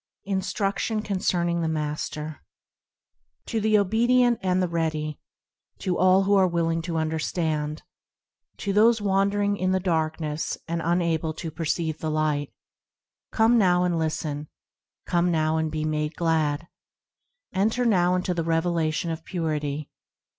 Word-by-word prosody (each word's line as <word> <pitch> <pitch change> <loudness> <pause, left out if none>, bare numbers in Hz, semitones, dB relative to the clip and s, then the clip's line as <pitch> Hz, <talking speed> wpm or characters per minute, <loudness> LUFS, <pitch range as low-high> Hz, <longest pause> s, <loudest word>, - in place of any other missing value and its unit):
Instruction, 200 +2 -1
concerning 175 -4 0
the 165 - 0
Master 150 0 -3 1.1
TO 225 -2 -2
the 215 0 +4
obedient 240 +4 +3
and 185 -1 +1
the 180 - +1
ready; 155 -3 -2 0.6
To 185 -2 -1
all 185 +2 +4
who 200 +1 +2
are 190 -2 +5
willing 165 -1 0
to 165 - -1
understand; 155 -1 -1 0.7
To 200 - -2
those 225 +3 +5
wandering 200 0 +1
in 185 0 +1
the 190 - +2
darkness, 160 -3 -1
and: 170 0 -2
unable 165 -2 0
to 160 0 -5
perceive 160 0 -2
the 160 - -2
Light: 150 -2 0 0.4
– - - -67
Come 230 +1 +4
now, 180 -3 +4
and 175 -2 +1
listen; 155 -2 -2 0.6
Come 175 0 +1
now, 160 -1 +1
and 160 -1 -1
be 155 0 -2
made 150 0 -1
glad; 160 -2 0 0.9
Enter 220 +6 +1
now 180 -5 +3
into 180 0 0
the 170 -1 -1
revelation 165 0 0
of 160 0 -5
Purity. 150 -4 -3
170 Hz, 140 wpm, -25 LUFS, 155-190 Hz, 1.1 s, are